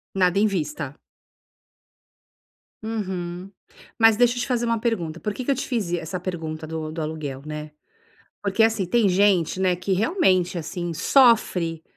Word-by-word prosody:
Nada 180 Hz, 0 st, +2 dB
em 215 Hz, -, +4 dB
vista. 150 Hz, -6 st, -3 dB, 1.9 s
Uhum. 185 Hz, -4 st, -4 dB, 0.5 s
Mas 225 Hz, -2 st, +5 dB
deixa 245 Hz, 0 st, +4 dB
eu 245 Hz, -, -2 dB
te -, -, -3 dB
fazer 240 Hz, -2 st, 0 dB
uma 230 Hz, 0 st, +1 dB
pergunta, 175 Hz, -9 st, -2 dB
por 210 Hz, -, -2 dB
que 255 Hz, -, -6 dB
que 280 Hz, -, +1 dB
eu 275 Hz, -, +2 dB
te -, -, -3 dB
fiz 225 Hz, -9 st, -1 dB
e 175 Hz, -, +1 dB
essa 180 Hz, +3 st, -5 dB
pergunta 160 Hz, -3 st, -5 dB
do 160 Hz, -1 st, -5 dB
do 160 Hz, -, -5 dB
aluguel, 150 Hz, -4 st, -5 dB
né, 150 Hz, 0 st, -6 dB, 0.7 s
porque, 205 Hz, +2 st, 0 dB
assim, 220 Hz, -4 st, +2 dB
tem 215 Hz, +1 st, +2 dB
gente, 185 Hz, -2 st, +2 dB
né, 185 Hz, -1 st, +2 dB
que 180 Hz, +2 st, -4 dB
realmente, 185 Hz, -, +2 dB
assim, 170 Hz, +2 st, -4 dB
sofre, 180 Hz, -, +3 dB
185 Hz, 165 wpm, -23 LUFS, 160-225 Hz, 1.9 s, Mas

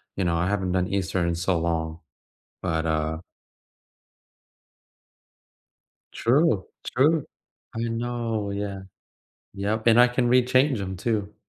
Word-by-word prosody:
you 95 Hz, -, -1 dB
know, 85 Hz, -, +1 dB
I 90 Hz, -, 0 dB
haven't 95 Hz, -2 st, -1 dB
done 90 Hz, 0 st, +1 dB
Easter 95 Hz, -2 st, -1 dB
in 85 Hz, -, 0 dB
so 85 Hz, 0 st, 0 dB
long, 80 Hz, -1 st, -2 dB, 0.6 s
but, 80 Hz, -3 st, -1 dB
uh 80 Hz, 0 st, -1 dB, 2.9 s
True, 120 Hz, -, +2 dB, 0.2 s
true, 150 Hz, +4 st, +2 dB, 0.5 s
I 115 Hz, -, -2 dB
know, 115 Hz, -3 st, -2 dB
yeah. 100 Hz, -1 st, -4 dB, 0.7 s
Yep, 105 Hz, +3 st, -2 dB
and 115 Hz, +1 st, +7 dB
I 125 Hz, -, +7 dB
can 125 Hz, 0 st, 0 dB
rechange 130 Hz, 0 st, +3 dB
‘em 95 Hz, -1 st, -4 dB
too. 105 Hz, 0 st, -2 dB
100 Hz, 120 wpm, -25 LUFS, 90-120 Hz, 2.9 s, and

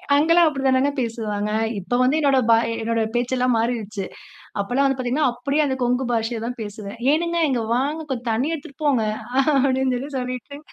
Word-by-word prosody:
அங்கெல்லாம் 330 Hz, +3 st, +5 dB
அப்பிடி 275 Hz, -3 st, -2 dB
தானங்க 265 Hz, +2 st, +3 dB
பேசுவாங்க. 215 Hz, -3 st, -2 dB, 0.3 s
இப்ப 220 Hz, +6 st, -1 dB
வந்து 265 Hz, +4 st, +3 dB
என்னுடைய 275 Hz, -4 st, +3 dB
பா 225 Hz, -, +7 dB, 0.2 s
என்னோட 230 Hz, 0 st, 0 dB
பேச்சு 245 Hz, +2 st, 0 dB
எல்லாம் 250 Hz, -1 st, +2 dB
மாறிருச்சு. 220 Hz, -4 st, -2 dB, 0.6 s
அப்பல்லாம் 255 Hz, +7 st, +1 dB
வந்து 270 Hz, -1 st, 0 dB
பார்த்தீங்கனா, 260 Hz, +3 st, +1 dB
அப்பிடியே 280 Hz, +5 st, 0 dB
அந்த 265 Hz, -1 st, -1 dB
கொங்கு 250 Hz, +2 st, +1 dB
பாஷைய 225 Hz, 0 st, -1 dB
தான் 245 Hz, 0 st, -5 dB
பேசுவேன், 205 Hz, 0 st, -8 dB
ஏனுங்க 340 Hz, +2 st, 0 dB
இங்க 245 Hz, -3 st, 0 dB
வாங்க 290 Hz, +6 st, -1 dB
கொஞ்சம் 245 Hz, -2 st, -3 dB
தண்ணீ 260 Hz, +8 st, 0 dB
எடுத்துட்டு 285 Hz, -1 st, -9 dB
போங்க 260 Hz, -7 st, +3 dB, 0.5 s
அப்பிடினு 265 Hz, -1 st, +2 dB
சொல்லி 270 Hz, +4 st, -5 dB
சொல்லிட்டு. 255 Hz, +3 st, -5 dB
255 Hz, 175 wpm, -22 LUFS, 230-280 Hz, 0.6 s, பா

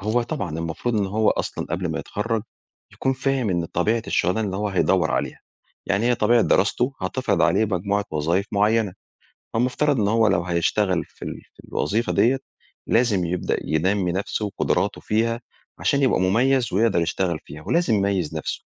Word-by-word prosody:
هو 110 Hz, +5 st, +1 dB
طبعًا 85 Hz, -8 st, -4 dB
المفروض 85 Hz, +8 st, -2 dB
إن 100 Hz, -2 st, +1 dB
هو 110 Hz, +3 st, +2 dB
أصلًا -, -, -2 dB
قبل -, -, -2 dB
ما -, -, -3 dB
يتخرج 110 Hz, +1 st, -2 dB, 0.5 s
يكون 135 Hz, -, 0 dB
فاهم 130 Hz, -4 st, 0 dB
إن 85 Hz, -2 st, 0 dB
طبيعة 110 Hz, +8 st, 0 dB
الشغلانه 105 Hz, +3 st, +1 dB
إن 95 Hz, -, -4 dB
هو 105 Hz, +1 st, -1 dB
هيدور 95 Hz, -3 st, +2 dB
عليها، -, -, -2 dB, 0.5 s
يعني 100 Hz, +4 st, +1 dB
هي 125 Hz, -, +4 dB
طبيعة 120 Hz, 0 st, +3 dB
دراسته 120 Hz, +7 st, +2 dB
هتفرض 125 Hz, +8 st, 0 dB
عليه 110 Hz, -, +3 dB
مجموعة 100 Hz, +1 st, -1 dB
وظايف 85 Hz, +6 st, 0 dB
معيّنة، 105 Hz, -1 st, +2 dB, 0.6 s
فالمفترض 125 Hz, +3 st, +1 dB
إن 100 Hz, -, +2 dB
هو 110 Hz, 0 st, +3 dB
لو 90 Hz, -3 st, +2 dB
هيشتغل 90 Hz, +1 st, +1 dB
في -, -, -27 dB
ال -, -, -6 dB
في -, -, -16 dB
الوظيفة 110 Hz, +9 st, 0 dB
ديّة 130 Hz, +4 st, +3 dB, 0.5 s
لازم 110 Hz, -6 st, +2 dB
يبدأ 90 Hz, +1 st, -1 dB
ينمّي 90 Hz, +3 st, +1 dB
نفسه 100 Hz, +3 st, -2 dB
وقدراته 100 Hz, -, -1 dB
فيها 115 Hz, +2 st, 0 dB, 0.4 s
عشان 140 Hz, -1 st, +1 dB
يبقى 130 Hz, -, +3 dB
مميّز 120 Hz, +6 st, +2 dB
ويقدر 100 Hz, -2 st, +3 dB
يشتغل 85 Hz, 0 st, -1 dB
فيها، 75 Hz, +1 st, -10 dB
ولازم 170 Hz, -9 st, +2 dB
يميز 95 Hz, -6 st, 0 dB
نفسه. 75 Hz, -, -4 dB
105 Hz, 165 wpm, -23 LUFS, 90-115 Hz, 0.6 s, هي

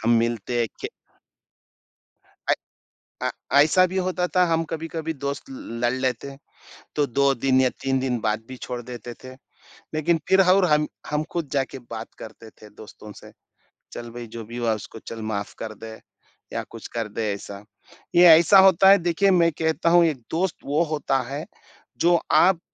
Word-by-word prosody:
हम 115 Hz, -, +3 dB
मिलते 115 Hz, +1 st, -1 dB
हैं 115 Hz, -, +1 dB
के -, -, -4 dB, 1.6 s
अये -, -, -2 dB, 0.5 s
अ, -, -, 0 dB, 0.3 s
ऐसा 170 Hz, +5 st, +4 dB
भी 185 Hz, +1 st, -6 dB
होता 185 Hz, -1 st, 0 dB
था, 180 Hz, -, +6 dB
हम 165 Hz, 0 st, +1 dB
कभी-कभी 165 Hz, 0 st, -4 dB
दोस्त 140 Hz, 0 st, -3 dB
ल 115 Hz, -3 st, -8 dB
लड़ 120 Hz, -, +3 dB
लेते 130 Hz, 0 st, -2 dB
हैं, 135 Hz, -, -12 dB, 0.6 s
तो 145 Hz, -1 st, +2 dB
2 140 Hz, +2 st, +2 dB
दिन 130 Hz, +1 st, +2 dB
या 130 Hz, -, +4 dB
3 135 Hz, 0 st, +1 dB
दिन 130 Hz, -2 st, -1 dB
बात 110 Hz, 0 st, -1 dB
भी 130 Hz, -, -8 dB
छोड़ 125 Hz, -1 st, -4 dB
देते 120 Hz, -1 st, -8 dB
थे। 130 Hz, -, -9 dB, 0.6 s
लेकिन 160 Hz, +2 st, +1 dB
फिर 190 Hz, 0 st, +5 dB
ह 180 Hz, -1 st, +5 dB
और 195 Hz, -1 st, +4 dB
हम 150 Hz, 0 st, +3 dB, 0.2 s
हम 150 Hz, +1 st, 0 dB
खुद 170 Hz, -4 st, -3 dB
जाके 135 Hz, -1 st, -1 dB
बात 110 Hz, 0 st, -7 dB
करते 110 Hz, 0 st, -11 dB
थे 105 Hz, -, -11 dB
दोस्तों 105 Hz, 0 st, -12 dB
से, -, -, -14 dB, 0.6 s
चल 120 Hz, 0 st, -7 dB
भई 120 Hz, 0 st, -8 dB
जो 115 Hz, -, -5 dB
भी 120 Hz, +3 st, -8 dB
हुआ 115 Hz, -2 st, +1 dB
उसको 110 Hz, +1 st, -10 dB
चल 115 Hz, -1 st, -6 dB
माफ 100 Hz, -1 st, -4 dB
कर 110 Hz, -1 st, -5 dB
दे 110 Hz, -, -8 dB, 0.6 s
या -, -, -2 dB
कुछ -, -, -9 dB
कर 115 Hz, -2 st, -2 dB
दे 105 Hz, 0 st, -3 dB
ऐसा। 100 Hz, 0 st, -9 dB, 0.5 s
ये 175 Hz, +1 st, +7 dB
ऐसा 165 Hz, +4 st, +7 dB
होता 190 Hz, 0 st, +6 dB
है, 200 Hz, -, +8 dB
देखिए 175 Hz, +2 st, +2 dB
मैं 170 Hz, -2 st, +4 dB
कहता 160 Hz, +1 st, +1 dB
हूँ 175 Hz, 0 st, +6 dB
एक 155 Hz, -4 st, 0 dB
दोस्त 175 Hz, +2 st, 0 dB
वो 145 Hz, +4 st, +1 dB
होता 135 Hz, -3 st, 0 dB
है, 145 Hz, +3 st, -4 dB, 0.5 s
जो 170 Hz, 0 st, +3 dB
आप 185 Hz, -2 st, +5 dB
140 Hz, 185 wpm, -24 LUFS, 115-170 Hz, 1.6 s, है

